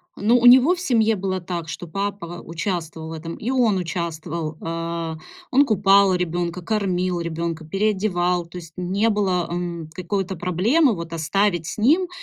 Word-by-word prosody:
Ну, 230 +4 +3
у 245 - +1
него 260 +8 +8
в - - -9
семье 225 -9 +2
было 190 -1 -2
так, 170 -2 -5
что 170 +1 -6
папа 195 -1 -4
участвовал 165 -2 -4
в - - -7
этом, 165 +1 -6
и 235 - -5
он 240 -7 +2
участвовал. 165 -2 -4
Э, 165 0 -3 0.3
он 280 +2 +5
купал 200 -3 +4
ребёнка, 175 0 -2
кормил 185 -3 -1
ребёнка, 165 -1 -3
переодевал, 185 -2 0
то 170 +2 -10
есть 165 -1 -13
не 195 +5 +1
было, 190 -5 0
м, 170 -2 -4
какой-то 190 +1 -3
проблемы 210 - +2
вот 170 -2 -6
оставить 175 +1 0
с 190 - -5
ним. 325 - +3
180 Hz, 160 wpm, -22 LUFS, 170-205 Hz, 0.3 s, него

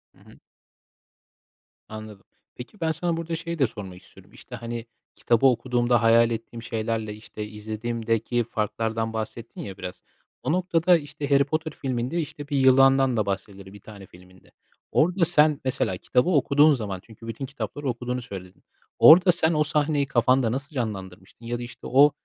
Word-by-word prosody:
Hı - - -24
hı. - - -18 1.5
Anladım. 110 -2 -10 0.3
Peki, 125 +12 -11
ben, 160 -1 +1
sana 165 +1 -2
burada 165 0 -3
şeyi 170 0 -5
de 135 - +4
sormak 95 -4 -9
istiyorum. - - -18
İşte, - - -11
hani, 115 0 -6 0.3
kitabı 120 +3 +1
okuduğumda 120 -1 +2
hayal 115 +1 +5
ettiğim 115 +1 -6
şeylerle, 115 -2 -3
işte, 105 0 -8
izlediğimdeki 115 +2 -2
farklardan 110 +1 -2
bahsettin 110 +1 -6
ya 95 -2 -8
biraz. 90 - -8 0.4
O - - 0
noktada, 175 0 +3
işte, 145 -1 -6
Harry 140 0 +5
Potter 155 +2 -3
filminde, 130 +4 -2
işte, 145 -1 -8
bir 145 - -1
yılandan 135 -1 +5
da 105 - +1
bahsedilir 100 0 -5
bir 105 - -12
tane 100 -3 -12
filminde. 90 +1 -19 0.4
Orada 175 +3 +3
sen, 155 -3 +3
mesela 130 -8 -1
kitabı 125 - +1
okuduğun 145 -1 +4
zaman, 100 -7 -4
çünkü 115 0 -14
bütün 115 +4 -5
kitapları 140 +1 -6
okuduğunu 125 +1 -3
söyledin, 95 -6 -10 0.4
orada 180 +3 +8
sen, 165 -1 +1
o 150 -1 +2
sahneyi 150 -1 0
kafanda 125 -1 +2
nasıl 140 +4 -5
canlandırmıştın 95 -3 -6
ya 120 +1 -2
da, - - -6
işte, 120 - -9
o, 140 +3 +6
120 Hz, 160 wpm, -25 LUFS, 110-145 Hz, 1.5 s, orada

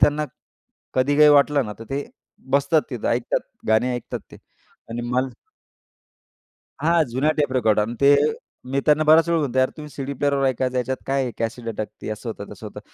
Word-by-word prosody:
त्यांना 150 +1 +3 0.7
कधी 135 +3 +2
काही 150 0 +7
वाटलं 145 -1 +4
ना, 105 - -5
तर 115 - -8
ते 140 +1 -2 0.5
बसतात 140 +3 +3
तिथं. 120 -4 -3
ऐकतात 120 0 0 0.3
गाणे 115 +3 +3
ऐकतात 120 - -5
ते. - - -10 0.5
आणि 115 +1 -4
मल 130 +2 +1 1.5
हां. 165 +1 +3
जुन्या 135 +6 +1
टेप 145 -3 +1
रेकॉर्ड 110 -5 +3
आणि 110 +3 -2
ते 140 +1 +7 0.6
मी 135 +1 +1
त्यांना 150 +1 +4
बराच 160 +2 +6
वेळा 170 -1 +2
म्हणतो, 130 -4 -1
"यार 130 0 +3
तुम्ही 150 -1 -8
सीडी 140 0 -5
प्लेअरवर 140 0 +1
ऐका. 130 -1 0
याच्यात 125 +1 -1
काय 135 0 +1
आहे, 125 - -2
कॅसेट 115 +1 -3
अटकती 110 -1 -6
असं 110 +3 -6
होतं 100 -2 -7
तसं - - -10
होतं." - - -9
135 Hz, 185 wpm, -23 LUFS, 120-145 Hz, 1.5 s, काही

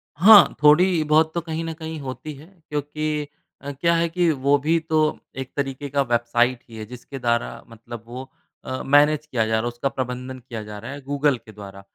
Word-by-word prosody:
हाँ। 195 0 +8
थोड़ी 165 +3 +5
बहुत 155 +1 +3
तो 170 - -1
कहीं 165 0 -4
न 165 - -4
कहीं 160 -1 -7
होती 140 +3 -7
है 140 +3 -14 0.2
क्योंकि 150 0 -3 0.3
अ, 140 - -6
क्या 170 +5 +1
है 170 0 +1
कि 175 0 +1
वो 140 0 +2
भी 165 +2 +2
तो 160 0 -2 0.4
एक 130 -1 -6
तरीके 140 0 -3
की 140 - -7
वेबसाइट 120 -1 +1
ही 115 - -12
है 110 - -6
जिसके 125 +4 -10
द्वारा 120 -1 -1
मतलब 115 0 -10
वो 130 +2 -8 0.4
अ, 130 - -4
मैनेज 150 +2 +4
किया 125 -7 -1
जा 110 - -4
रहा 110 - +2
है 120 - -2
उसका 120 +3 -2
प्रबंधन 130 0 -5
किया 115 -3 -8
जा 105 0 -9
रहा 120 +5 -8
है 145 +1 -8
गूगल 140 0 0
के 110 - -16
द्वारा। 100 -2 -11
140 Hz, 210 wpm, -23 LUFS, 120-155 Hz, 0.4 s, हाँ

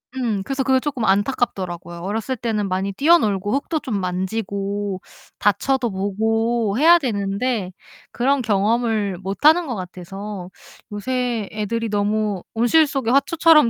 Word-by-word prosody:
음. 225 -6 -1
그래서 270 +2 -2
그게 265 -1 +3
조금 260 -5 -2
안타깝더라고요. 190 -5 -1
어렸을 220 +7 -2
때는 220 -3 -1
많이 190 +2 -1
뛰어놀고 210 - +3
흙도 300 +3 -1
좀 215 -8 -3
만지고 195 +1 -3 0.4
다쳐도 235 +4 +1
보고 220 +3 0
해야 340 +3 +7
되는데 205 - -1 0.4
그런 270 +2 +1
경험을 215 -2 +1
못하는 300 - +3
것 245 - -3
같아서 185 +1 -7 0.4
요새 240 0 -2
애들이 220 +2 -2
너무 205 -1 0
온실 285 +7 +4
속의 265 -4 -1
화초처럼 305 -1 +5
215 Hz, 300 characters per minute, -21 LUFS, 195-255 Hz, 0.4 s, 해야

